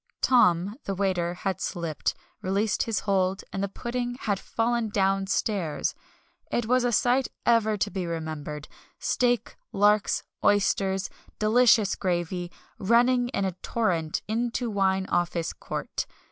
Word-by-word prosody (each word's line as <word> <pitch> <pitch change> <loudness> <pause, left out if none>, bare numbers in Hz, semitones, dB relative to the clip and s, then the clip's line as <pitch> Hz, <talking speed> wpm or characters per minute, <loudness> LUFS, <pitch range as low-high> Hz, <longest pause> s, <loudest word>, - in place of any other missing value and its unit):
"Tom" 200 -4 +3
the 195 - -2
waiter 180 -3 0
had 190 +1 -3
slipped, 165 -5 -2 0.3
released 200 +3 0
his 225 -3 0
hold, 190 -1 +1
and 195 - -2
the 200 - 0
pudding 245 +3 -3
had 200 -3 0
fallen 230 0 -1
downstairs! 195 -3 0 0.6
It 240 - 0
was 250 +2 +3
a 245 - +2
sight 245 +3 +3 0.2
ever 220 -2 +3
to 205 0 -1
be 185 -3 -3
remembered 155 -2 -5 0.3
steak, 245 -1 0
larks, 205 +1 +3 0.2
oysters, 195 -1 +2 0.3
"delicious 215 -1 +4
gravy," 175 -1 -2 0.3
running 245 +4 +3
in 200 -6 -1
a 190 - 0
torrent 170 -9 -1
into 235 +2 -1
Wine 190 -1 +1
Office 175 -2 -1
Court. - - -4
200 Hz, 130 wpm, -27 LUFS, 185-230 Hz, 0.6 s, delicious